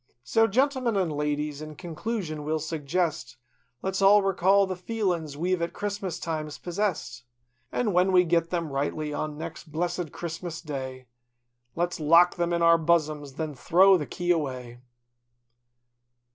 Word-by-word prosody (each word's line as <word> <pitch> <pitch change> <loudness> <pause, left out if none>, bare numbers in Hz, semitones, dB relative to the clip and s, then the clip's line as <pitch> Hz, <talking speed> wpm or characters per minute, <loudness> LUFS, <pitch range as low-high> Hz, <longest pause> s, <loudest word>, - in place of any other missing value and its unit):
So, 225 - +3
gentlemen 255 -1 +1
an' 180 -4 +1
ladies, 150 0 -2
in 155 0 -8
conclusion 170 -2 -4
we'll 155 +2 0
suggest. 155 -4 -2 0.5
Let's 190 0 -1
all 200 +1 +6
recall 195 +1 +3
the 190 -1 -4
feelins 180 -7 -2
we've 180 +2 0
at 170 - -2
Christmas 200 -4 -4
times 155 -2 -4
possessed. 175 - -3 0.5
An' 220 -5 0
when 180 +2 +3
we 180 -1 +6
git 170 -1 +1
them 170 -4 -2
rightly 150 +2 -2
on 150 0 -3
next 160 0 -8
blessed 175 +1 -2
Christmas 170 0 -6
Day, 130 -4 -6 0.7
Let's 175 +1 -1
lock 165 +3 +5
them 175 -1 -1
in 170 0 +1
our 170 0 +6
bossoms 155 -4 0
an' - - -23
then 155 -2 -3
throw 185 +9 +5
the 150 -5 -2
key 175 -1 -1
away. 130 -7 -2
170 Hz, 150 wpm, -27 LUFS, 150-185 Hz, 0.7 s, all